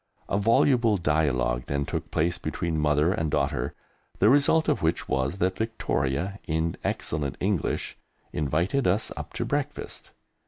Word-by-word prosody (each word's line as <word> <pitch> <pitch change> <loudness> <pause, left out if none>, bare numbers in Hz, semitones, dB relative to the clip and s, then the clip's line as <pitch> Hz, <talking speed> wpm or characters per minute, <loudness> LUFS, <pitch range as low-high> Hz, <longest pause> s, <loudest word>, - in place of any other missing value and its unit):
A - - -1
voluble 115 +1 +4
dialogue 65 -7 +1
then 70 0 -1
took - - -4
place 85 +3 0
between 85 -2 -2
mother 75 +2 +3
and 80 -4 -1
daughter, 70 -1 -1 0.4
the 105 - +5
result 145 +3 +4
of - - +1
which 80 +1 0
was 65 +7 0
that 95 0 0
Victoria, 95 -4 -1
in 80 0 0
excellent 75 -3 -2
English, 95 -4 -1 0.3
invited 85 - 0
us 100 +5 +1
up - - -7
to - - -2
breakfast. - - -4
80 Hz, 145 wpm, -26 LUFS, 75-100 Hz, 0.4 s, the